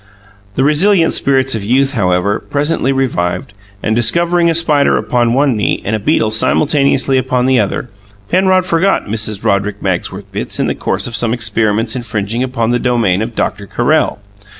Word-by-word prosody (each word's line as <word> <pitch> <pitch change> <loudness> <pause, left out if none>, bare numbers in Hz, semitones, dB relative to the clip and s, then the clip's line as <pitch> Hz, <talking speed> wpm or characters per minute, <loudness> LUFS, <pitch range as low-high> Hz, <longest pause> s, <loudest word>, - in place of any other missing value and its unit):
The 130 - +1
resilient 165 +4 +3
spirits 135 -1 +1
of 110 -3 -3
youth, 135 +5 +1
however, 95 -2 0
presently 145 -1 -1
revived, 120 -9 -2 0.3
and 110 - 0
discovering 170 +8 +2
a 165 - +1
spider 155 -4 +2
upon 120 -1 0
one 135 -2 +2
knee 105 - 0
and 110 - 0
a - - -2
beetle 110 +1 +1
simultaneously 135 +3 +2
upon 125 -1 0
the 130 -1 +3
other, 105 +4 -2 0.4
Penrod 185 0 +2
forgot 185 +2 +1
Mrs. 110 -1 -2
Roderick 100 +1 0
Magsworth 95 +1 -3
Bitts 100 - -5
in - - +1
the - - 0
course - - -2
of 120 - -3
some 115 0 0
experiments 110 0 0
infringing 110 -1 -3
upon 120 -3 -1
the 120 - +1
domain 115 -7 +1
of 115 +1 -4
Doctor 100 0 -2
Carrel. 150 +6 0
120 Hz, 170 wpm, -14 LUFS, 105-140 Hz, 0.4 s, resilient